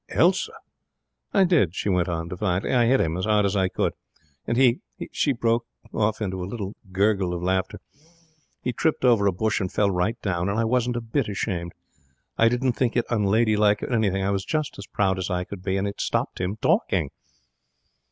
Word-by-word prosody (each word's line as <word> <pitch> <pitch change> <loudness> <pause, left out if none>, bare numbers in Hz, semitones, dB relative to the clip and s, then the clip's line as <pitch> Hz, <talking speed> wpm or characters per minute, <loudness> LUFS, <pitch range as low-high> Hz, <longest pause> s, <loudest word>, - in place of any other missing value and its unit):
'Elsa!' - - +2 0.8
'I 195 - +4
did!' 150 - +3
she - - -3
went 90 -3 +1
on, 85 -1 -3
defiantly. 90 +3 -1
'I 120 -2 +4
hit 130 +2 +4
him 80 0 0
as 95 - -2
hard 105 -1 +3
as 100 +1 0
I 95 -2 +2
could, - - -1 0.5
and 115 - 0
he 125 -1 +4 0.2
he' - - -7
she 145 - +1
broke 115 -1 0 0.3
off 110 0 0
into 95 -2 -3
a 90 - -5
little 100 -3 -5 0.2
gurgle 95 -2 +1
of 85 - -5
laughter 95 0 -1 0.8
'he 125 - -1
tripped 155 +2 0
over 115 -5 +4
a - - +4
bush 105 +3 0
and 95 - -2
fell 100 -1 +2
right 90 +5 -1
down; 90 -2 -1
and 100 - -1
I - - +2
wasn't 120 +1 +1
a - - -2
bit 115 +2 -1
ashamed. 90 -4 -3 0.6
I 115 - +4
didn't 125 +1 +1
think 120 0 0
it 120 - +2
unladylike 105 -1 +2
or - - -3
anything. 100 -4 +1
I 100 - +1
was 100 -1 -1
just 155 +5 -2
as 100 - -8
proud 95 -2 0
as 95 - -3
I 90 -1 -1
could 90 0 -9
be. 95 +1 -1
And 100 +1 0
it 100 - -5
stopped - - -1
him 95 +4 -2
talking.' - - +1
105 Hz, 210 wpm, -24 LUFS, 95-115 Hz, 0.8 s, I